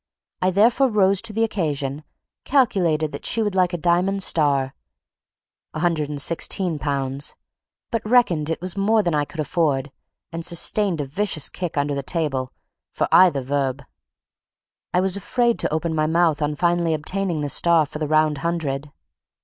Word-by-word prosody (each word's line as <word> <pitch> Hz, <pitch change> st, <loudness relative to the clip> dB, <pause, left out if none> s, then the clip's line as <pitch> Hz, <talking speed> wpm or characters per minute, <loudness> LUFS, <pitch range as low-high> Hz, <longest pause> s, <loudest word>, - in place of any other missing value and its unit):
I 185 Hz, -, +3 dB
therefore 230 Hz, +8 st, +3 dB
rose 195 Hz, -3 st, +2 dB
to 230 Hz, -, -3 dB
the 225 Hz, +2 st, 0 dB
occasion; 150 Hz, -9 st, -2 dB, 0.4 s
calculated 170 Hz, -, +1 dB
she 225 Hz, -, +1 dB
would 205 Hz, -2 st, -1 dB
like 185 Hz, -2 st, +2 dB
a 175 Hz, -, -2 dB
diamond 180 Hz, +4 st, +1 dB
star 140 Hz, -6 st, +2 dB, 1.0 s
(£116), 150 Hz, -3 st, -1 dB, 0.6 s
but 225 Hz, -3 st, -3 dB
reckoned 175 Hz, -11 st, +3 dB
it 165 Hz, -, -2 dB
was 185 Hz, +1 st, -3 dB
more 210 Hz, +2 st, +2 dB
than 175 Hz, -3 st, 0 dB
I 145 Hz, -1 st, +1 dB
could 160 Hz, -, -12 dB
afford; 145 Hz, -3 st, 0 dB, 0.4 s
and 165 Hz, 0 st, -5 dB
sustained 175 Hz, 0 st, +1 dB
a -, -, -3 dB
vicious 155 Hz, +1 st, -1 dB
kick 175 Hz, -4 st, -5 dB
under 145 Hz, 0 st, 0 dB
the 140 Hz, -, -2 dB
table 135 Hz, -4 st, -2 dB, 0.4 s
for -, -, -1 dB
either 175 Hz, -7 st, +5 dB
verb. 135 Hz, 0 st, -2 dB, 1.1 s
I 180 Hz, -, +2 dB
was 190 Hz, 0 st, +1 dB
afraid 235 Hz, +4 st, 0 dB
to -, -, -1 dB
open 160 Hz, +1 st, -1 dB
my 155 Hz, -1 st, +1 dB
mouth 165 Hz, -2 st, +2 dB
on 150 Hz, 0 st, -1 dB
finally 170 Hz, 0 st, +1 dB
obtaining 175 Hz, +1 st, -2 dB
the 145 Hz, -, -2 dB
star 165 Hz, +2 st, +3 dB
for 150 Hz, +1 st, -8 dB
the 155 Hz, -, -2 dB
round 155 Hz, -1 st, +2 dB
hundred. 150 Hz, -4 st, -3 dB
165 Hz, 155 wpm, -22 LUFS, 145-190 Hz, 1.1 s, either